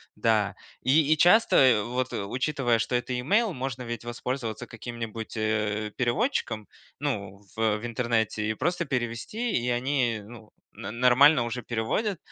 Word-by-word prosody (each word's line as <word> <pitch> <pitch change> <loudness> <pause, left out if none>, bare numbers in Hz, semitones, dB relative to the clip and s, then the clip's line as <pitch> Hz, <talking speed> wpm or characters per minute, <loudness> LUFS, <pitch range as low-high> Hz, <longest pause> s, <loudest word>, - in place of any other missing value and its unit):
Да. 110 -3 +1 0.3
И 150 +3 +4
и - - -1
часто, 150 - +5
вот, 125 +1 -2
учитывая, 120 +3 0
что 125 - -1
это 125 0 -1
имейл, 205 - +2
можно 130 -2 -4
ведь 115 -1 -5
воспользоваться 120 -1 -4
каким-нибудь, 115 -1 -7
э, 110 -1 -1
переводчиком, 120 - -1 0.3
ну, 100 -9 -3
в 110 -1 +1
в 110 - -7
интернете 115 -2 -1
и 110 - -1
просто 175 +6 -1
перевести, 130 - -2
и 120 +1 0
они, 120 -2 0
ну, 115 -2 -13 0.2
но - - -7
нормально 125 +4 +5
уже 120 +1 -4
переводят. 120 - -1
120 Hz, 140 wpm, -27 LUFS, 110-135 Hz, 0.3 s, часто